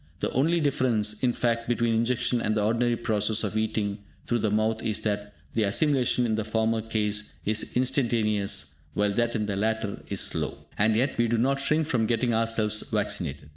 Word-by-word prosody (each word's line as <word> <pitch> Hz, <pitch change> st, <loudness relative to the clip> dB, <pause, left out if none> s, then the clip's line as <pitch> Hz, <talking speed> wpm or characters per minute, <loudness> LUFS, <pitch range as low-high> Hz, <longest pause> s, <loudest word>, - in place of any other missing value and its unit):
The -, -, -1 dB
only 165 Hz, +7 st, +2 dB
difference, 115 Hz, -8 st, +1 dB
in 125 Hz, -, +3 dB
fact, 115 Hz, -1 st, -1 dB
between 120 Hz, -1 st, +1 dB
injection 120 Hz, +1 st, +1 dB
and 110 Hz, -, 0 dB
the 105 Hz, -, +1 dB
ordinary 120 Hz, +2 st, +1 dB
process 110 Hz, -1 st, 0 dB
of 105 Hz, 0 st, -2 dB
eating 110 Hz, -2 st, -1 dB, 0.3 s
through 120 Hz, -, 0 dB
the 110 Hz, -, +1 dB
mouth 110 Hz, +1 st, +1 dB
is 110 Hz, -1 st, -1 dB
that 105 Hz, -1 st, -3 dB, 0.2 s
the 115 Hz, -, +1 dB
assimilation 125 Hz, +3 st, +2 dB
in 110 Hz, -, 0 dB
the 110 Hz, 0 st, 0 dB
former 110 Hz, +1 st, 0 dB
case 105 Hz, -2 st, -2 dB
is 110 Hz, +1 st, -1 dB
instantaneous, 115 Hz, -6 st, 0 dB, 0.2 s
while 105 Hz, 0 st, +1 dB
that 120 Hz, +2 st, 0 dB
in 105 Hz, -2 st, 0 dB
the 100 Hz, -1 st, -2 dB
latter 110 Hz, 0 st, -1 dB
is -, -, 0 dB
slow. -, -, -3 dB
And 110 Hz, +1 st, +3 dB
yet 130 Hz, +2 st, 0 dB
we 120 Hz, -, +3 dB
do 115 Hz, +1 st, +1 dB
not 135 Hz, +4 st, +1 dB
shrink 155 Hz, +3 st, +2 dB
from 120 Hz, -7 st, +1 dB
getting 120 Hz, +1 st, +1 dB
ourselves 110 Hz, -1 st, +1 dB
vaccinated! 90 Hz, -10 st, -2 dB
110 Hz, 190 wpm, -27 LUFS, 105-120 Hz, 0.3 s, in